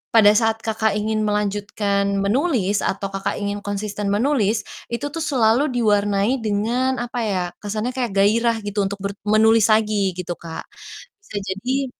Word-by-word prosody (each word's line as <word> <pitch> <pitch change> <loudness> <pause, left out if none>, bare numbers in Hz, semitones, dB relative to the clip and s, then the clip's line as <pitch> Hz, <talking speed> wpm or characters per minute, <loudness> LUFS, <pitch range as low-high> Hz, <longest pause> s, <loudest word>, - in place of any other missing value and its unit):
pada 210 -2 +8
saat 225 0 +1
Kakak 220 -2 0
ingin 215 0 0
melanjutkan 205 -1 0 0.2
menulis 215 - +1
atau 195 0 -2
Kakak 195 0 -2
ingin 205 0 -3
konsisten 205 0 -4
menulis, 215 -1 +1 0.2
itu 280 +5 -4
tuh 330 - -5
selalu 265 -3 +2
diwarnai 205 +2 +2
dengan 230 +5 0
apa 245 0 -4
ya, 200 -5 0 0.2
kesannya 215 +4 -3
kayak 250 -4 -2
gairah 225 +4 +3
gitu 205 0 -3
untuk 200 - -4
ber 200 - -1 0.2
menulis 220 +1 +5
lagi 210 -4 +2
gitu 180 -1 -5
Kak, 165 -1 -7 0.6
bisa 210 - -9
jadi 255 +8 -1
215 Hz, 150 wpm, -21 LUFS, 200-235 Hz, 0.6 s, pada